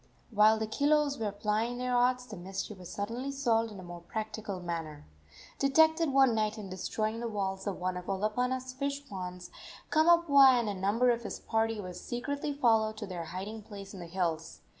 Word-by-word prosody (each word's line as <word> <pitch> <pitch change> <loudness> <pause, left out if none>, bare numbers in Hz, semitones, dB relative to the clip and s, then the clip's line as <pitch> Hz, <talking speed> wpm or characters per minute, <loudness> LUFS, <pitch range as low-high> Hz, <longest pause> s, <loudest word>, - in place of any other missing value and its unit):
While 215 0 +5
the 220 - -1
kilos 285 +5 +2
were 215 -2 -1
plying 215 +4 -1
their 250 0 -1
arts 250 +1 +2
the 220 - -9
mystery 190 +3 -5
was 180 -2 -10
suddenly 235 +7 -3
solved 230 -5 +1
in 200 - -9
a - - -9
more 175 -1 -9
practical 215 +1 -5
manner. 165 -4 -5 0.5
Detected 320 +3 +4
one 270 -3 +5
night 215 0 0
in 200 -3 -7
destroying 215 +4 -2
the 235 - -3
walls 195 -2 -3
of 200 - -3
one 185 0 -1
of 180 - -8
Olopana's 250 +6 -1
fish 280 +1 -3
ponds, 180 -4 -7 0.4
Kamapuaa 310 -6 +6
and 235 - -1
a - - -1
number 205 +6 +2
of 235 0 -1
his 235 - -6
party 225 0 0
were 185 -3 -6
secretly 280 +10 -4
followed 225 -6 +2
to 215 - -5
their 180 -4 -5
hiding 195 +6 -6
place 200 -1 -10
in 195 - -8
the 170 - -7
hills. 165 -2 -2
220 Hz, 190 wpm, -31 LUFS, 190-250 Hz, 0.5 s, Kamapuaa